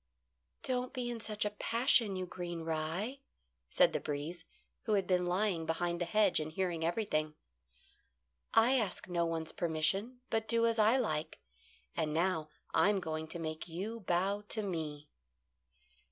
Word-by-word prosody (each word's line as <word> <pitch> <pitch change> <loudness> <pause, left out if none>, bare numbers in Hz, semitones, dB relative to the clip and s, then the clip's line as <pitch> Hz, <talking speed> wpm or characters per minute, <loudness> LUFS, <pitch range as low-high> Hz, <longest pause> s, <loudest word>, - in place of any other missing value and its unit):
"Don't 250 -1 -1
be 245 -2 -2
in 235 - -4
such 215 -1 -2
a 210 - 0
passion, 230 -1 +2
you 185 0 -2
green 175 -2 -5
rye," 165 - -2 0.5
said - - +4
the - - +1
breeze, 155 +4 -4 0.4
who 220 - +1
had 195 -2 +3
been 180 -1 +2
lying 180 -3 +1
behind 170 +1 -1
the - - +2
hedge 205 +1 +3
and 155 0 -3
hearing 175 -1 -1
everything. 165 -4 0 1.2
"I 245 +4 +5
ask 210 -5 -2
no 170 -2 +1
one's 165 -1 -2
permission, 180 +9 0
but 225 0 0
do 230 0 +3
as 230 -1 +2
I 220 +4 +6
like; 215 -11 -1 0.6
and 155 -2 0
now 165 -2 +1 0.2
I'm 195 +5 +4
going 160 -2 -3
to 165 - -6
make 155 -1 -4
you 195 +8 -4
bow 195 +1 +1
to 220 - 0
me." 155 -6 -4
180 Hz, 155 wpm, -34 LUFS, 160-215 Hz, 1.2 s, I